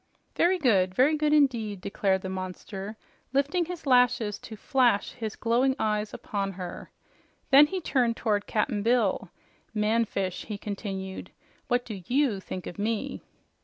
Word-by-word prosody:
"Very 360 +2 +3
good, 195 - +2
very 280 +7 +4
good 300 0 +1
indeed," 235 -9 +2
declared 190 0 0
the - - -3
monster, 190 +2 -6 0.4
lifting 290 +6 +1
his 345 -2 -7
lashes 245 -5 +3
to 220 - -9
flash 245 -2 +2
his 220 -3 -5
glowing 250 +3 +2
eyes 210 -1 0
upon 195 -1 -3
them. 180 -1 -7 0.6
Then 285 +2 +9
he 380 +4 -3
turned 245 -7 +1
toward 210 -3 0
Cap'n 210 0 0
Bill. 220 -4 +1 0.5
"Man 220 +2 +2
fish," 190 -3 -3
he 210 - -5
continued, 195 -2 -5 0.4
"what 245 0 +1
do 205 -5 -6
YOU 255 -6 +2
think 185 -1 -7
of 175 - -8
me?" 220 +1 -2
220 Hz, 150 wpm, -27 LUFS, 200-260 Hz, 0.6 s, Then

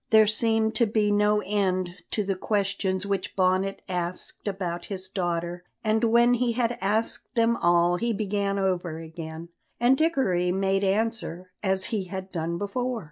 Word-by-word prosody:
There 220 -1 +7
seemed 220 +1 +2
to 235 - +3
be 210 -1 +1
no 210 0 +3
end 185 -3 0 0.2
to 210 - 0
the 195 0 0
questions 195 -1 -1
which 195 -2 -2
Bonnet 190 +1 +1
asked 180 +2 -4
about 175 -3 -3
his 190 -2 -4
daughter, 175 -2 -2 0.2
and 220 +1 +1
when 235 +2 +5
he 245 -1 +1
had 240 0 0
asked 215 +5 -1
them 230 0 +3
all 175 0 +3
he 235 +4 0
began 200 -1 -1
over 180 -4 -1
again, 160 0 -8 0.3
and 245 +3 +5
Dickory 260 - +1
made 195 +1 +1
answer, 195 -3 -1
as 190 -1 +2
he 200 -4 0
had 190 +1 -6
done 170 0 -2
before. 245 +5 -2
195 Hz, 160 wpm, -26 LUFS, 180-220 Hz, 0.3 s, There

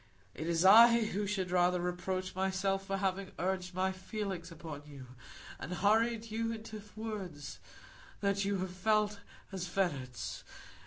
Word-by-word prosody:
It 155 - -5
is 170 +1 +2
I 230 +4 +9
who 205 -1 -2
should 190 -3 -1
rather 180 0 +3
reproach 180 +1 -2
myself 190 +1 0
for 195 -1 -1
having 195 0 -1
urged 185 0 -2
my 190 +1 +1
feelings 190 -2 -5
upon 155 -3 -7
you, 140 -3 -10 0.5
and 180 - -5
hurried 220 +4 +2
you 225 +1 -1
into 220 -1 -7
words 190 -11 -6 0.6
that 200 0 +1
you 200 0 0
have 185 0 -3
felt 210 +2 +1 0.3
as 185 -2 -4
fetters. 145 -10 -2
190 Hz, 145 wpm, -33 LUFS, 180-210 Hz, 0.6 s, I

